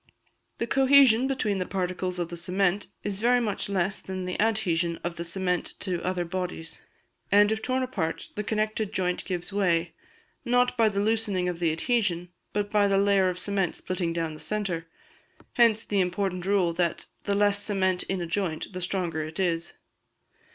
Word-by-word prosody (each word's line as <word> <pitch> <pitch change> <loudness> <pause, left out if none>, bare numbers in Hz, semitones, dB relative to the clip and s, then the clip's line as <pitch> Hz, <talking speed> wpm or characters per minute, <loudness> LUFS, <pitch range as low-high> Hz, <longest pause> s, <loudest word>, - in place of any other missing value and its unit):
The - - -1
cohesion 265 -1 +5
between 215 -7 0
the 185 - -1
particles 185 -1 -2
of 175 -1 -2
the 170 - -5
cement 185 +3 0 0.2
is 200 -1 -2
very 245 +3 +4
much 210 -4 -1
less 195 0 0
than 185 -1 -5
the 180 - -3
adhesion 175 -7 +1
of 175 0 -3
the 170 - -4
cement 180 +1 -1
to 180 -3 -2
other 180 -1 -1
bodies; 180 -2 -5 0.5
and 205 +1 +6
if 220 0 -1
torn 255 +2 0
apart, 165 -10 -3
the 210 - -3
connected 215 0 -1
joint 180 -2 0
gives 180 +1 -4
way, 175 -4 +1 0.5
not 245 0 +2
by 225 -2 +4
the 200 -1 -2
loosening 210 -4 +1
of 175 -1 -3
the 170 -2 +2
adhesion, 180 -1 0 0.2
but 205 0 -2
by 205 -1 +4
the 195 -1 +2
layer 195 -1 +4
of 180 - -4
cement 195 -2 -1
splitting 180 -2 -2
down 165 -1 -2
the 155 - -10
centre. 185 -6 -3 0.7
Hence 230 -2 +4
the 200 -2 +1
important 185 0 -1
rule 190 -4 +2
that 170 0 -1 0.2
the 200 - +1
less 205 0 +3
cement 190 -3 +1
in 190 -2 -2
a - - -2
joint 170 0 -2
the 185 - -5
stronger 175 -3 -2
it 155 +4 -7
is. 170 -2 0
190 Hz, 180 wpm, -27 LUFS, 175-210 Hz, 0.7 s, and